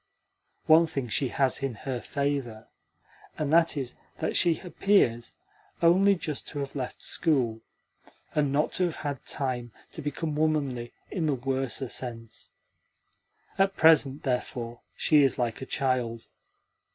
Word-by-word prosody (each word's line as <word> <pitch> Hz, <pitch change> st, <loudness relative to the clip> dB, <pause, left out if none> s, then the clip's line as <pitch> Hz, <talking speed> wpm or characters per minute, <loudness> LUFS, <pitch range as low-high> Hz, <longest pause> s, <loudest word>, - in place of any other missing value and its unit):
One 160 Hz, +1 st, +6 dB
thing 135 Hz, -6 st, -4 dB
she 135 Hz, +5 st, +1 dB
has 130 Hz, +1 st, +1 dB
in 135 Hz, -4 st, -2 dB
her 125 Hz, +2 st, -4 dB
favour 140 Hz, -6 st, -3 dB, 0.7 s
and 150 Hz, 0 st, -1 dB
that 165 Hz, -2 st, +4 dB
is 130 Hz, -3 st, -3 dB, 0.2 s
that -, -, -2 dB
she 170 Hz, -3 st, +3 dB
appears 175 Hz, -, +1 dB, 0.4 s
only 190 Hz, +4 st, +5 dB
just 155 Hz, -5 st, -5 dB
to 145 Hz, -, -6 dB
have 140 Hz, +1 st, -6 dB
left 130 Hz, -3 st, -4 dB
school, 125 Hz, -9 st, +1 dB, 0.7 s
and 145 Hz, -2 st, +1 dB
not 145 Hz, +2 st, +1 dB
to 185 Hz, -, +2 dB
have 170 Hz, -, -2 dB
had 145 Hz, -3 st, -5 dB
time 125 Hz, -4 st, -2 dB, 0.2 s
to -, -, -7 dB
become 150 Hz, +1 st, -3 dB
womanly 140 Hz, -6 st, 0 dB, 0.2 s
in 165 Hz, -4 st, -1 dB
the 145 Hz, -, +2 dB
worser 135 Hz, 0 st, -2 dB
sense. 115 Hz, -3 st, -5 dB, 1.1 s
At 195 Hz, 0 st, +2 dB
present, 150 Hz, -3 st, +5 dB
therefore, 120 Hz, -2 st, -3 dB
she 150 Hz, -2 st, +4 dB
is 135 Hz, -2 st, +3 dB
like 120 Hz, -1 st, -2 dB
a 130 Hz, -, -6 dB
child. 125 Hz, -4 st, -1 dB
135 Hz, 140 wpm, -28 LUFS, 125-155 Hz, 1.1 s, One